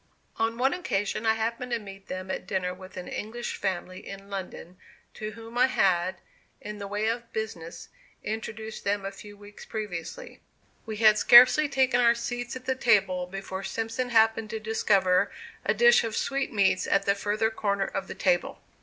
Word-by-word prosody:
On 225 Hz, +1 st, 0 dB
one 265 Hz, +3 st, +2 dB
occasion 215 Hz, -, -2 dB
I 220 Hz, -, +4 dB
happened 235 Hz, +3 st, -3 dB
to -, -, +2 dB
meet 195 Hz, -3 st, -11 dB
them 185 Hz, 0 st, -5 dB
at -, -, -5 dB
dinner 185 Hz, -2 st, -1 dB
with 185 Hz, 0 st, -12 dB
an 180 Hz, -, -6 dB
English 240 Hz, +3 st, -5 dB
family 185 Hz, -1 st, -3 dB
in 195 Hz, 0 st, -9 dB
London, 185 Hz, -2 st, -7 dB, 0.4 s
to 215 Hz, 0 st, -6 dB
whom 230 Hz, +2 st, -7 dB
I 250 Hz, -, +6 dB
had, 185 Hz, -6 st, +2 dB, 0.4 s
in 210 Hz, 0 st, -8 dB
the 200 Hz, -, -5 dB
way 205 Hz, +2 st, -2 dB
of 235 Hz, +1 st, -2 dB
business, 180 Hz, -6 st, -5 dB, 0.4 s
introduced 220 Hz, 0 st, -5 dB
them 200 Hz, 0 st, -1 dB
a 195 Hz, -, -3 dB
few 205 Hz, +1 st, -12 dB
weeks 205 Hz, 0 st, -13 dB
previously. 180 Hz, -7 st, -6 dB, 0.5 s
We 215 Hz, -1 st, -4 dB
had 215 Hz, -1 st, +5 dB
scarcely 255 Hz, +5 st, +8 dB
taken 260 Hz, -3 st, +2 dB
our 235 Hz, -1 st, +5 dB
seats 245 Hz, +1 st, -4 dB
at 255 Hz, 0 st, -8 dB
the 260 Hz, -, +1 dB
table 195 Hz, -8 st, +2 dB
before 195 Hz, 0 st, -6 dB
Simpson 230 Hz, +4 st, -3 dB
happened 225 Hz, -1 st, +3 dB
to 220 Hz, -, -4 dB
discover 200 Hz, -4 st, +2 dB, 0.3 s
a -, -, +1 dB
dish 475 Hz, 0 st, +6 dB
of 225 Hz, -1 st, -3 dB
sweetmeats 210 Hz, -9 st, +1 dB
at 195 Hz, 0 st, +2 dB
the 200 Hz, -, +4 dB
further 210 Hz, +2 st, 0 dB
corner 200 Hz, -3 st, -1 dB
of 195 Hz, 0 st, -4 dB
the -, -, -7 dB
table. 180 Hz, -2 st, 0 dB
210 Hz, 180 wpm, -27 LUFS, 195-230 Hz, 0.5 s, scarcely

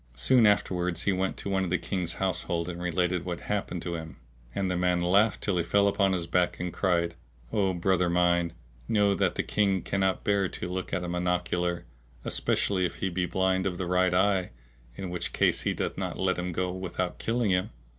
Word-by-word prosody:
Soon 120 Hz, -, +4 dB
afterwards 90 Hz, -4 st, +1 dB
he 100 Hz, -, +2 dB
went 95 Hz, 0 st, -1 dB
to -, -, -6 dB
one 95 Hz, -1 st, +1 dB
of 90 Hz, -, -2 dB
the 90 Hz, -, +2 dB
King's 90 Hz, -4 st, -3 dB
household 85 Hz, -2 st, 0 dB
and 90 Hz, -1 st, -5 dB
related 90 Hz, 0 st, 0 dB
what 90 Hz, -2 st, -4 dB
had -, -, -3 dB
happened 95 Hz, -4 st, -3 dB
to 85 Hz, -, -3 dB
him; 80 Hz, -2 st, -6 dB, 0.4 s
and 100 Hz, -, 0 dB
the -, -, 0 dB
man 90 Hz, 0 st, +2 dB
laughed 100 Hz, +5 st, +3 dB
till 100 Hz, -4 st, +1 dB
he -, -, +1 dB
fell 100 Hz, +4 st, +3 dB
upon 100 Hz, -1 st, +2 dB
his 90 Hz, -3 st, -1 dB
back 90 Hz, 0 st, +1 dB
and 90 Hz, -1 st, -3 dB
cried, 85 Hz, -3 st, +1 dB, 0.4 s
"O 95 Hz, -2 st, +2 dB
brother 90 Hz, 0 st, +2 dB
mine, 85 Hz, -1 st, +2 dB, 0.3 s
know 105 Hz, -2 st, +3 dB
that -, -, +1 dB
the -, -, 0 dB
King 100 Hz, -3 st, +1 dB
cannot 95 Hz, -1 st, 0 dB
bear 100 Hz, -2 st, +2 dB
to -, -, -5 dB
look 90 Hz, +1 st, -4 dB
at 90 Hz, -, -1 dB
a -, -, -3 dB
monocular, 90 Hz, 0 st, -1 dB, 0.4 s
especially 95 Hz, -2 st, 0 dB
if 90 Hz, -, -1 dB
he 95 Hz, -, -2 dB
be 90 Hz, 0 st, -1 dB
blind 95 Hz, 0 st, +1 dB
of 90 Hz, -2 st, -3 dB
the 95 Hz, -, -2 dB
right 90 Hz, 0 st, +2 dB
eye, 95 Hz, -1 st, +2 dB, 0.5 s
in 95 Hz, -2 st, -5 dB
which 90 Hz, -, -4 dB
case -, -, +2 dB
he -, -, 0 dB
doth -, -, -3 dB
not -, -, -3 dB
let 95 Hz, -1 st, 0 dB
him 90 Hz, 0 st, -2 dB
go 90 Hz, +1 st, -1 dB
without 90 Hz, -1 st, -3 dB
killing 115 Hz, -2 st, 0 dB
him." 90 Hz, 0 st, +1 dB
90 Hz, 215 wpm, -28 LUFS, 90-95 Hz, 0.5 s, Soon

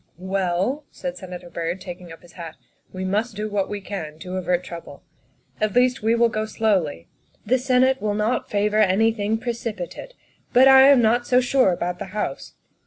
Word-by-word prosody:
" -, -, -42 dB, 0.2 s
Well," 195 Hz, +10 st, 0 dB
said 265 Hz, -1 st, -6 dB
Senator 180 Hz, -5 st, -9 dB
Byrd, 170 Hz, +2 st, -3 dB
taking 180 Hz, -2 st, -9 dB
up 165 Hz, -, -13 dB
his 175 Hz, -, -16 dB
hat, 165 Hz, -3 st, -9 dB, 0.2 s
" -, -, -41 dB
we 185 Hz, 0 st, -5 dB
must 210 Hz, +4 st, -1 dB
do 210 Hz, +1 st, -3 dB
what 205 Hz, -2 st, -1 dB
we 205 Hz, -, -4 dB
can 160 Hz, -6 st, -6 dB
to 185 Hz, 0 st, -6 dB
avert 180 Hz, -1 st, 0 dB
trouble. 170 Hz, -5 st, -10 dB, 0.6 s
At 215 Hz, -2 st, 0 dB
least 250 Hz, 0 st, +3 dB
we 225 Hz, +2 st, +2 dB
will 235 Hz, 0 st, +4 dB
go 215 Hz, -1 st, -3 dB
slowly. 185 Hz, -, -1 dB, 0.4 s
The 255 Hz, +4 st, +2 dB
Senate 260 Hz, +1 st, +2 dB
will 210 Hz, -1 st, -1 dB
not 215 Hz, +4 st, -1 dB
favor 210 Hz, +1 st, +1 dB
anything 215 Hz, +2 st, +2 dB
precipi 230 Hz, -5 st, -4 dB
tate, -, -, -11 dB, 0.4 s
but 260 Hz, +2 st, +7 dB
I 265 Hz, 0 st, +8 dB
am 275 Hz, -4 st, +6 dB
not 240 Hz, +2 st, +2 dB
so 250 Hz, -, +4 dB
sure 255 Hz, -4 st, +3 dB
about 175 Hz, 0 st, -3 dB
the -, -, -4 dB
House. 135 Hz, -9 st, -4 dB
210 Hz, 195 wpm, -23 LUFS, 180-240 Hz, 0.6 s, I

